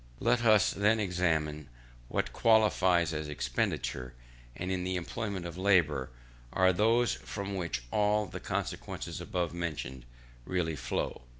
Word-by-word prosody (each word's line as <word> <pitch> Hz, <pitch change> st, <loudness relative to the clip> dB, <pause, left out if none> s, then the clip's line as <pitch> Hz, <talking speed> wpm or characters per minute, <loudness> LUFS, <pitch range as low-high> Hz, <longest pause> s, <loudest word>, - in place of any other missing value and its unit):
Let 120 Hz, 0 st, +2 dB
us 110 Hz, -2 st, +5 dB
then 105 Hz, +3 st, +2 dB
examine 80 Hz, -6 st, 0 dB, 0.4 s
what -, -, -2 dB
qualities 95 Hz, -7 st, +4 dB
in 75 Hz, -1 st, -3 dB
expenditure, 65 Hz, -3 st, -2 dB, 0.4 s
and 90 Hz, +1 st, -3 dB
in 90 Hz, -1 st, -1 dB
the 95 Hz, 0 st, -1 dB
employment 95 Hz, +1 st, -3 dB
of 85 Hz, +1 st, -6 dB
labour, 85 Hz, -9 st, +3 dB, 0.4 s
are 95 Hz, 0 st, +4 dB
those 115 Hz, +4 st, +3 dB
from 100 Hz, -1 st, -5 dB
which 85 Hz, -9 st, -3 dB
all 105 Hz, 0 st, +2 dB
the 95 Hz, -, -7 dB
consequences -, -, -4 dB
above 90 Hz, -2 st, -2 dB
mentioned 75 Hz, -7 st, -4 dB, 0.4 s
really 85 Hz, 0 st, -1 dB
flow. -, -, -3 dB
90 Hz, 130 wpm, -31 LUFS, 80-105 Hz, 0.4 s, us